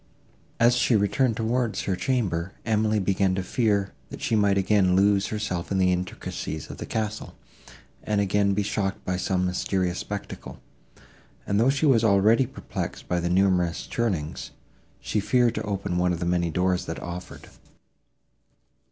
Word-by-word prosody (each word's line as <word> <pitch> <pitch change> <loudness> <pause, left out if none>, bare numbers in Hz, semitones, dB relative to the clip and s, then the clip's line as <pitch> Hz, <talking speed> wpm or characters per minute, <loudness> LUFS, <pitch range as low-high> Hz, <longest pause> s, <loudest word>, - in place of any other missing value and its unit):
As 120 +1 +5
she 120 -1 +3
returned 105 +3 +2
towards 115 0 0
her 95 - 0
chamber, 95 -7 -1
Emily 110 -1 +1
began 95 -1 +1
to 95 - -2
fear, 100 -2 0 0.2
that - - -8
she 115 - 0
might 100 -2 +3
again 95 -2 +3
lose 100 +1 +3
herself 100 -5 -3
in 95 - +1
the 90 -1 +3
intricacies 90 -4 -5
of - - -9
the - - -7
castle, 110 -1 -3 0.7
and 105 -1 -1
again 100 0 +2
be 105 - +1
shocked 100 -1 -2
by 90 - -1
some 90 0 0
mysterious 90 0 -1
spectacle; 100 -1 -7 0.9
and, 100 0 +1
though 120 +4 +4
she 145 +3 +1
was 125 -6 +4
already 110 +4 +4
perplexed 135 - -6
by 90 - 0
the 85 0 -1
numerous 90 -2 +2
turnings, 95 -11 -2 0.5
she 110 - -1
feared 120 +3 +2
to - - -3
open 100 -4 -2
one 90 0 +2
of 85 - -2
the 85 - -2
many 85 -1 +1
doors 90 +2 0
that 80 - -4
offered. 90 +1 -8
100 Hz, 160 wpm, -25 LUFS, 90-110 Hz, 0.9 s, As